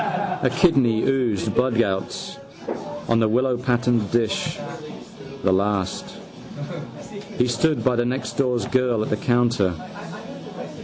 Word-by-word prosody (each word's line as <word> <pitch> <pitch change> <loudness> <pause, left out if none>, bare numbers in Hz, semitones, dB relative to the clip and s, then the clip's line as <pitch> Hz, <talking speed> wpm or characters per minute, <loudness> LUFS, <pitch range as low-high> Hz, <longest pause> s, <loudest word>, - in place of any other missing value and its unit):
A - - +3
kidney 135 - +4
oozed 125 -8 +1
bloodgouts 115 -7 0 0.7
on 115 0 +3
the 110 -1 +3
willowpatterned 125 -2 +1
dish: 115 -3 0 0.9
the 95 - +4
last. 95 -1 -1 1.2
He 125 - +4
stood 125 +6 +1
by 130 -2 +3
the 120 - +2
nextdoor 125 0 -1
girl 125 -4 +2
at - - -4
the 105 - +2
counter. 120 -7 +2
120 Hz, 105 wpm, -23 LUFS, 110-125 Hz, 1.2 s, kidney